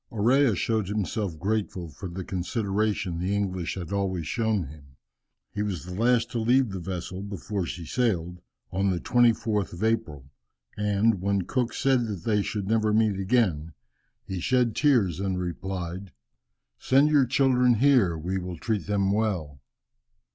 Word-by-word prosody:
Orea 120 +2 +3
showed 110 +1 0
himself 100 -3 -2
grateful 95 -1 -2
for 90 +6 -8
the 95 +2 -6
consideration 100 -1 -1
the 95 +3 -1
English 95 -4 -2
had 95 0 -6
always 95 -4 -1
shown 110 +1 0
him. 70 -2 -13 0.6
He 105 - -3
was 95 -6 -3
the 90 - -7
last 115 +4 +2
to 120 - -2
leave 120 +1 +3
the 95 - -4
vessel 90 +1 -5
before 100 -1 -4
she 85 0 -6
sailed, 90 -5 -1 0.3
on 95 +1 +1
the 90 -2 0
24th 110 -6 +2
of 85 - -6
April, 100 - -1 0.4
and 105 0 +1
when 100 0 +1
Cook 125 +5 -1
said 130 -3 +2
that 100 -6 -5
they 105 -2 +2
should 100 -1 -3
never 110 0 +2
meet 105 -2 +2
again, 95 -7 +1 0.5
he 95 -1 -4
shed 120 +4 +1
tears 115 - +2
and 95 -1 -1
replied, 90 0 -5 0.7
"Send 140 +3 +4
your 140 -4 +4
children 125 -1 +3
here, 115 -9 +4
we 90 +4 -2
will 90 -1 -6
treat 105 +3 -2
them 100 -1 +1
well." 90 -11 -1
100 Hz, 155 wpm, -26 LUFS, 90-115 Hz, 0.7 s, Send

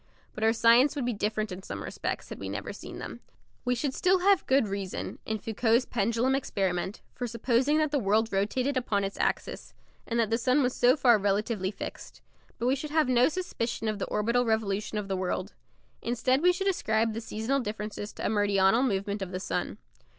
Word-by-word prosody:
But 215 - -5
our 220 - +5
science 235 +5 +5
would 275 -4 -2
be 245 - 0
different 215 0 -2
in 180 +1 -6
some - - -6
respects - - -4
had - - -7
we - - -5
never - - -5
seen - - -9
them. - - -7 0.5
We 250 0 +2
should 265 +2 -2
still 370 +3 +2
have 395 0 +3
good 265 -4 +3
reason, 195 -1 -4
in 220 - -1
Foucault's 225 +3 +1
pendulum 235 +3 +1
experiment, 195 -7 -1
for 245 - -4
supposing 245 +5 +1
that 305 -2 +1
the 290 - +2
world 220 +1 +1
rotated 250 +8 0
upon 210 -5 0
its 195 0 -4
axis, - - -2 0.3
and 235 0 -1
that 225 -1 +1
the 230 - +2
sun 255 +4 +3
was 250 0 +1
so 245 +4 +4
far 240 -5 +5
relatively 200 0 0
fixed; 200 - -8 0.4
but 235 - -3
we 255 +2 +3
should 295 +3 -5
have 310 -2 +2
no 250 +2 +5
suspicion 245 -10 -3
of 215 -1 -1
the - - -2
orbital 235 +4 +1
revolution 215 -2 -1
of 210 -1 -3
the 195 - -1
world. 185 +1 -2 0.5
Instead 245 +3 +1
we 360 +1 +6
should 385 +2 -2
ascribe 225 - +1
the 225 - -4
seasonal 225 +5 -1
differences 210 -2 -5
to - - -6
a - - +2
meridional 205 +1 +3
movement 200 -4 -1
of 190 - -3
the 185 - -3
sun. - - -3
230 Hz, 205 wpm, -28 LUFS, 205-255 Hz, 0.5 s, we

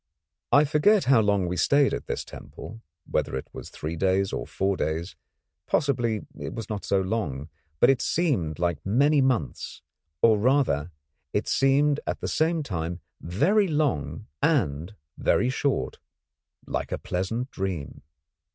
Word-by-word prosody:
I 145 - +7
forget 155 +8 +4
how 130 -3 +5
long 100 -3 +2
we 90 +1 -2
stayed 140 +8 +3
at - - -4
this - - -3
temple, 115 +1 -10 0.2
whether - - -1
it 65 - -5
was - - -8
three 80 +2 -5
days 95 +2 +1
or - - -3
four 95 0 0
days; 80 +2 -3 0.5
possibly 120 -7 0
it - - -5
was 115 -2 -6
not 105 -2 -4
so 100 - +1
long, 95 - -3 0.3
but 125 - +6
it 135 - 0
seemed 120 - 0
like 85 -3 -1
many 140 +8 +3
months, 110 - -1 0.4
or 110 -2 +6
rather 115 - +2 0.4
it - - 0
seemed 140 +2 +3
at - - -2
the - - -3
same 160 0 +1
time 85 - -4 0.2
very 170 - +2
long 150 - -1 0.2
and 105 - +1 0.2
very 125 - +2
short, 140 +1 -1 0.7
like - - -3
a - - -1
pleasant 115 +8 -3
dream. 95 -7 -4
110 Hz, 150 wpm, -26 LUFS, 90-140 Hz, 0.7 s, I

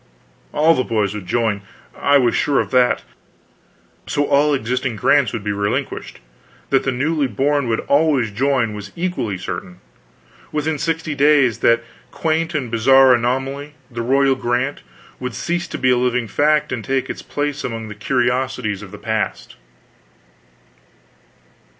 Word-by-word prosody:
All 160 +2 +4
the 130 - 0
boys 105 -5 0
would 105 -4 -7
join, 110 -1 0 0.3
I 140 0 +3
was 125 -3 +2
sure 140 -2 +2
of - - -2
that; 125 -1 +3 1.0
so, 145 - 0
all 145 +2 +3
existing 125 -2 -1
grants 140 +4 +3
would 115 -3 -5
be 105 - -1
relinquished; 100 0 -3 0.5
that 135 - +4
the 135 - +1
newly 145 +3 0
born 140 +4 0
would 115 -1 0
always 140 -6 +2
join 125 -1 +1
was 105 -1 -8
equally 170 - -2
certain. 90 0 -6 0.7
Within 150 0 -1
sixty 160 -1 -2
days 140 -4 +3
that 115 0 +3 0.3
quaint 165 0 -1
and 130 -6 -2
bizarre 130 +3 +6
anomaly, 135 +4 -1 0.2
the 115 0 -4
Royal 135 +3 +3
Grant, 125 +2 -1 0.4
would 125 -2 -5
cease 175 0 -2
to - - -5
be 130 - +2
a 125 - +3
living 125 -1 0
fact, 150 +4 +2
and 115 - -3
take 135 +2 -1
its - - -6
place 145 0 -3
among 115 -2 -4
the 105 - -7
curiosities 120 -2 -1
of 105 - -9
the 105 - -10
past. 110 +1 -3
130 Hz, 150 wpm, -20 LUFS, 115-145 Hz, 1.0 s, bizarre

